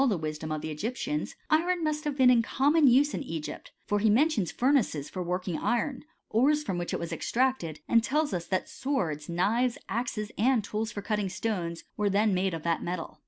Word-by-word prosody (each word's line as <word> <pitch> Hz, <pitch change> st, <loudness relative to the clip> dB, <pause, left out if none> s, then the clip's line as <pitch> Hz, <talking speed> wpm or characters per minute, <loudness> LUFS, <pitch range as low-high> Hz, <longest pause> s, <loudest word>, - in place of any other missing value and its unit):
64 240 Hz, -8 st, +3 dB
HISTORY 155 Hz, +1 st, -4 dB
OF 155 Hz, -1 st, -2 dB
CHEMISTRY^ 155 Hz, -, -3 dB
Egyptians, 250 Hz, -, -3 dB, 0.2 s
iron 345 Hz, +2 st, +2 dB
must 305 Hz, 0 st, -1 dB
have 290 Hz, -2 st, -2 dB
been 255 Hz, -2 st, +6 dB
in 240 Hz, -2 st, +5 dB
common 285 Hz, +6 st, +3 dB
use 275 Hz, +4 st, +5 dB
hx -, -, -2 dB
Egypt: 165 Hz, -, -6 dB
for 205 Hz, -, +1 dB
he 220 Hz, +1 st, +3 dB
mentions 240 Hz, -, +2 dB
furnaces 240 Hz, -, +1 dB
for 185 Hz, -, -4 dB
working 180 Hz, -1 st, -2 dB
iron 255 Hz, +3 st, -1 dB
;* -, -, -49 dB
ores 295 Hz, +7 st, +3 dB
from 185 Hz, -11 st, -2 dB
which 175 Hz, -, -3 dB
it -, -, -2 dB
was 170 Hz, -, -4 dB
extracted 250 Hz, -, 0 dB
;t -, -, -18 dB
and 230 Hz, -1 st, +4 dB
tells 300 Hz, +2 st, 0 dB
us 170 Hz, -2 st, -3 dB
that 185 Hz, -, -1 dB
swords 170 Hz, -, -2 dB
t, 170 Hz, -, -5 dB
knives, 230 Hz, +8 st, +1 dB
II -, -, -20 dB
axes, 230 Hz, -2 st, -2 dB
§ 210 Hz, -, 0 dB
and 250 Hz, -3 st, +3 dB
tools 215 Hz, +2 st, -3 dB
for 205 Hz, -, -6 dB
cutting 210 Hz, -2 st, -1 dB
stoneSylF 180 Hz, -4 st, -3 dB
were 210 Hz, -1 st, +1 dB
then 205 Hz, +1 st, +2 dB
made 185 Hz, -1 st, 0 dB
of 160 Hz, -, -7 dB
that 170 Hz, -1 st, 0 dB
metal. 175 Hz, -2 st, -5 dB
215 Hz, 225 wpm, -28 LUFS, 180-265 Hz, 0.2 s, been